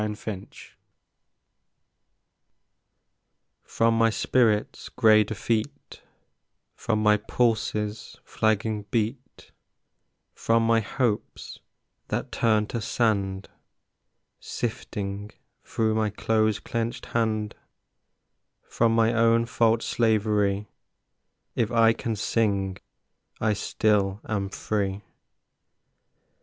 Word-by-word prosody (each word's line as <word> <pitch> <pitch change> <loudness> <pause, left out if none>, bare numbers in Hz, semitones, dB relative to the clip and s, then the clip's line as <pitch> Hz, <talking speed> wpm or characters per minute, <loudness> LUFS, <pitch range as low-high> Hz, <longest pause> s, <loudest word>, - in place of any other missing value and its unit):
Refuge 105 -2 -7 2.8
From 115 0 +1
my 115 0 +4
spirit's 110 -1 +1
gray 110 -3 +5
defeat, 110 +5 -3 0.7
From 110 0 -1
my 105 0 +5
pulse's 105 -1 -1
flagging 110 -1 -1
beat, 120 +4 -3 0.8
From 115 0 +1
my 115 0 +4
hopes 115 +1 -3 0.5
that - - -3
turned 110 -2 +1
to 115 - -3
sand 100 -4 0 0.9
Sifting 105 -3 -5 0.3
through 110 -1 0
my 110 -1 +1
close 110 0 +1
clenched 115 +1 -4
hand, 110 -2 -1 1.1
From 115 -1 +1
my 115 0 +3
own 115 0 +3
fault's 115 -1 +1
slavery, 105 -3 +1 0.9
If 115 -2 -1
I 115 -1 +5
can 115 0 -3
sing, 100 -3 0 0.6
I 110 -1 +1
still 100 -1 0
am 100 -4 -2
free. 100 -1 -3
110 Hz, 85 wpm, -26 LUFS, 105-115 Hz, 2.8 s, gray